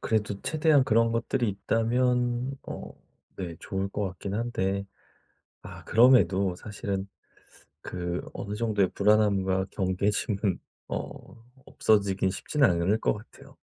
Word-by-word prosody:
그래도 105 -2 -1
최대한 155 -3 +3
그런 115 -1 +3
것들이 120 0 0
있다면 120 +5 0
어 - - -8 0.4
네 85 -3 -5
좋을 95 0 -3
것 105 +1 -3
같기는 100 +2 -5
한데 100 -4 -1 0.8
아 - - -10
그럼에도 100 -6 +4
사실은 100 -1 -4 0.7
그 90 -1 -4
어느 105 +1 -5
정도의 105 -4 +1
불안함과 100 -2 +3
경계심은 100 +1 0 0.3
어 115 - -7 0.2
없어지기는 100 -3 +2
쉽지는 140 +3 +2
않을 85 +5 +1
것 - - +2
같아요. 105 +2 -13
105 Hz, 265 characters per minute, -27 LUFS, 95-115 Hz, 0.8 s, 그럼에도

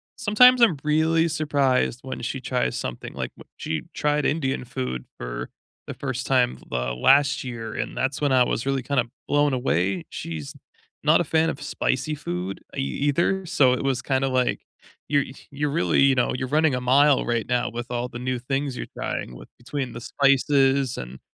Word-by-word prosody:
sometimes 245 +2 +5
I'm 180 -11 +5
really 160 +2 +2
surprised 140 -5 +1
when 130 - -6
she 130 +3 -3
tries 125 -1 -1
something. 65 - -5
Like, - - -4
wh - - -14 0.2
she 80 -2 -3
tried 150 0 0
Indian 135 -4 0
food 65 - -4
for - - -5 0.4
the - - -5
first 130 -2 -4
time, 125 -2 +2
uh, 60 0 -1
last 135 - +4
year, 115 -3 -6
and - - -4
that's 135 +3 -1
when 145 -2 +2
I 130 -1 +5
was 120 +1 -2
really 135 -2 0
kinda 125 -2 +1 0.2
blown 145 -1 +2
away. 95 -8 0
She's 80 -4 -6 0.5
not 155 +2 +5
a 175 - +2
fan 160 +2 +2
of 145 - -5
spicy 145 +1 -1
food 90 -6 -5 0.2
e - - -1
either, 145 - 0
so 135 -7 +3
it 130 - -2
was 135 -3 0
kinda 135 0 +1
like, 130 -1 0 0.5
"You're 145 -1 +2 0.3
you're 145 +1 -1
really, 170 - +2
you 135 -1 +5
know, 125 - +1
you're 130 0 -3
running 155 0 +2
a 125 - -3
mile 140 +3 +4
right 120 -1 -1
now 125 0 0
with 120 +1 -6
all 120 0 -2
the 120 -1 -8
new 125 0 -2
things 135 +1 -2
you're - - -4
trying 60 - -4
with" - - -12
between 130 +1 -4
the 115 - -6
spices, 135 -1 +2
and, 60 +1 -7
130 Hz, 190 wpm, -24 LUFS, 120-145 Hz, 0.5 s, sometimes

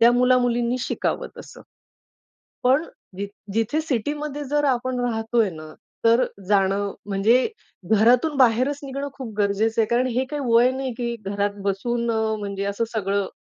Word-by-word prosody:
त्या 235 +1 +7
मुला, 250 +1 +4
मुलींनी 240 0 +1
शिकावं - - -2
तसं. - - -11 1.0
पण 265 +5 +4 0.3
जिथ 200 - -3 0.3
जिथे 225 +8 +1
सिटीमध्ये 295 +2 -3
जर 295 +2 0
आपण 255 -1 0
राहतोय 225 -2 +1
ना 155 -2 -10 0.3
तर 230 +2 +5 0.2
जाणं 200 0 +2
म्हणजे 210 +5 +3 0.4
घरातून 240 +8 +4
बाहेरच 260 +3 +3
निघणं 275 +1 -4
खूप 260 -5 -8
गरजेचं 210 +2 +1
आहे. 215 - +1
कारण 245 +2 +2
हे 255 +1 0
काही 295 +3 -5
वय 240 +2 +6
नाही 260 -1 -3
की 235 -1 -2
घरात 200 +1 -1
बसून 235 +4 -1
अ, 220 -1 0
म्हणजे 200 -1 -4
असं 200 +3 -1
सगळं, 200 -2 0
235 Hz, 150 wpm, -23 LUFS, 205-255 Hz, 1.0 s, त्या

